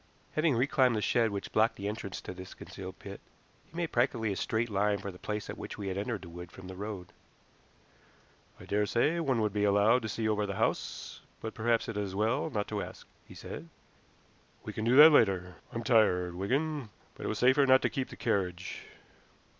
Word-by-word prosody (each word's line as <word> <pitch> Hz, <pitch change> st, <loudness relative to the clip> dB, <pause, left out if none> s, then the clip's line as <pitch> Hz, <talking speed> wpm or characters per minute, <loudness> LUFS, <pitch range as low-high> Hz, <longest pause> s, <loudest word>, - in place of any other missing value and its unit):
Having 155 Hz, -3 st, +2 dB
reclimbed 130 Hz, -1 st, +3 dB
the 105 Hz, -, 0 dB
shed 115 Hz, -2 st, +3 dB
which 100 Hz, -1 st, -5 dB
blocked 110 Hz, +1 st, +3 dB
the 100 Hz, -, -4 dB
entrance 105 Hz, -2 st, -5 dB
to -, -, -7 dB
this 95 Hz, 0 st, -10 dB
concealed -, -, -9 dB
pit, -, -, -9 dB, 0.5 s
he 165 Hz, -, -12 dB
made 170 Hz, -2 st, -1 dB
practically 120 Hz, -3 st, +1 dB
a -, -, -2 dB
straight 110 Hz, +4 st, -1 dB
line 100 Hz, +1 st, +2 dB
for 100 Hz, 0 st, -6 dB
the 90 Hz, -, -14 dB
place 105 Hz, 0 st, -4 dB
at -, -, -7 dB
which -, -, -7 dB
we 100 Hz, -1 st, -4 dB
had 95 Hz, -, -3 dB
entered 105 Hz, -2 st, -3 dB
the 85 Hz, -, -9 dB
wood 85 Hz, +1 st, -9 dB
from 95 Hz, -1 st, -11 dB
the 95 Hz, -, -8 dB
road. 100 Hz, -2 st, -6 dB, 1.5 s
"I -, -, -11 dB
daresay 115 Hz, +10 st, +1 dB
one 135 Hz, -8 st, +1 dB
would 105 Hz, -2 st, 0 dB
be 105 Hz, -1 st, 0 dB
allowed 105 Hz, +4 st, +4 dB
to 110 Hz, -, -4 dB
see 110 Hz, +2 st, -1 dB
over 105 Hz, -1 st, +1 dB
the 100 Hz, -, -3 dB
house, -, -, -2 dB, 0.2 s
but 110 Hz, -, -5 dB
perhaps 115 Hz, +1 st, +1 dB
it 115 Hz, -, -4 dB
is 105 Hz, -, 0 dB
as 95 Hz, -1 st, -6 dB
well 115 Hz, +9 st, +1 dB
not 105 Hz, -7 st, -2 dB
to 105 Hz, -2 st, -2 dB
ask," -, -, -9 dB, 0.2 s
he -, -, -13 dB
said. 85 Hz, -, -8 dB, 0.9 s
"We -, -, -6 dB
can 110 Hz, -, -3 dB
do 120 Hz, +2 st, +4 dB
that 155 Hz, +3 st, +11 dB
later. 95 Hz, -, +3 dB
I'm 115 Hz, -, -4 dB
tired, 100 Hz, -7 st, +3 dB
Wigan; 135 Hz, -, -1 dB, 0.2 s
but -, -, -6 dB
it -, -, -1 dB
was 110 Hz, -, -2 dB
safer 130 Hz, +4 st, +4 dB
not 130 Hz, 0 st, +6 dB
to -, -, +2 dB
keep 130 Hz, -1 st, -2 dB
the -, -, -9 dB
carriage." 90 Hz, -5 st, -2 dB
110 Hz, 215 wpm, -31 LUFS, 100-120 Hz, 1.5 s, that